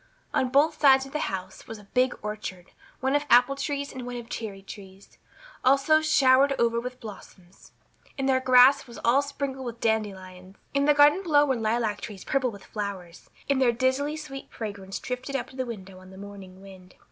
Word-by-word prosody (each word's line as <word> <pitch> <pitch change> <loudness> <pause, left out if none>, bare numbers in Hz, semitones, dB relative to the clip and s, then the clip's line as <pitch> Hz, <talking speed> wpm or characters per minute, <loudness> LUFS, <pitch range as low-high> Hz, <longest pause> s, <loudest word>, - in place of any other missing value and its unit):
On 260 - +1
both 300 +4 +2
sides 270 -2 +6
of 270 - -12
the 300 - -2
house 190 0 -7
was 225 - -7
a 210 - -14
big 250 +5 0
orchard, 210 -4 -6 0.3
one 265 +2 +1
of 290 - +1
apple 245 +3 +5
trees 280 0 -4
and 255 - -7
one 245 0 -6
of 235 -1 -8
cherry 200 -4 -6
trees, 195 -1 -13 0.4
also 275 +4 +4
showered 275 -3 +4
over 235 0 +1
with 250 +1 -7
blossoms; 195 -4 -13 0.5
and 270 -1 -1
their 260 -1 +3
grass 260 +1 +5
was 235 - -11
all 250 +4 +4
sprinkled 280 -2 -5
with 235 -2 -7
dandelions. 190 -4 -3 0.2
In 280 0 +2
the 295 0 +4
garden 295 +6 +5
below 295 -6 +3
were 265 -2 0
lilac 225 -2 -1
trees 205 -4 -8
purple 265 -2 0
with 200 -3 -12
flowers, 195 -5 -7 0.2
and 275 -1 +1
their 250 -2 +4
dizzily 260 +5 0
sweet 280 -3 -9
fragrance 200 -3 -6
drifted 255 +2 -5
up 270 - -3
to - - -16
the 260 -1 -3
window 190 -5 -9
on 185 0 -15
the 190 - -13
morning 195 -1 -11
wind. 185 -2 -15
245 Hz, 195 wpm, -26 LUFS, 200-275 Hz, 0.5 s, sides